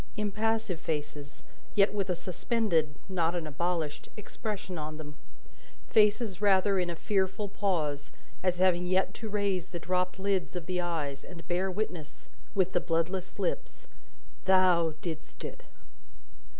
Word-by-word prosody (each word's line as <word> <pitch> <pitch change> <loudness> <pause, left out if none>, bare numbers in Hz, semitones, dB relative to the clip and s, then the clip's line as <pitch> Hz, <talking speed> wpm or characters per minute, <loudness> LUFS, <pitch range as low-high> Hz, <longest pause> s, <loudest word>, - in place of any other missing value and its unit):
Impassive 215 -2 0
faces, 150 -2 -4 0.3
yet 200 0 +5
with 200 -2 -1
a 180 - +2
suspended 175 -4 0
not 175 -3 +1
an 170 -2 -2
abolished 160 0 -2
expression 205 -2 -4
on 155 0 -5
them; 150 -1 -8 0.8
faces, 210 -2 +4
rather, 195 -1 +4
in 180 -1 0
a 170 - -2
fearful 190 +3 0
pause, 165 -8 -1 0.3
as 180 -1 +2
having 180 -1 +3
yet 190 +1 +2
to 220 - -6
raise 200 -4 0
the 175 - -5
dropped 180 +2 0
lids 190 -2 0
of 175 -2 -3
the 180 0 0
eyes, 150 -5 -2
and 170 -2 -10
bear 180 +2 +1
witness 180 -7 -4 0.3
with 190 -1 +2
the 175 - +3
bloodless 175 +3 -1
lips, - - -3 0.6
"THOU 180 -4 +5
DIDST 160 -3 -5
IT!" - - -7
185 Hz, 140 wpm, -30 LUFS, 165-200 Hz, 0.8 s, yet